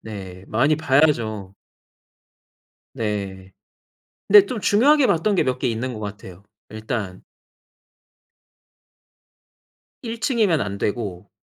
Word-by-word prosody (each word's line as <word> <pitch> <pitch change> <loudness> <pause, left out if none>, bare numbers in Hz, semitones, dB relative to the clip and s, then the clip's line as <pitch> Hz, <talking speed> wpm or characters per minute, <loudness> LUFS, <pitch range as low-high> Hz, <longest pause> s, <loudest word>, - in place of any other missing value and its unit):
네. 95 -4 -9
많이 140 +8 +2
봐야죠. 130 -10 +1 1.4
네. 100 -3 -4 0.8
근데 205 0 +8
좀 245 - -4
중요하게 260 +9 +4
봤던 185 +5 +1
게 - - +2
몇 130 0 -2
개 - - -1
있는 125 +2 -3
것 110 - -7
같아요. 100 -3 -9 0.3
일단 110 -3 -5 2.8
1 230 -1 -6
층이면 215 - +1
안 100 0 -3
되고 100 -3 -4
115 Hz, 175 characters per minute, -22 LUFS, 100-165 Hz, 2.8 s, 근데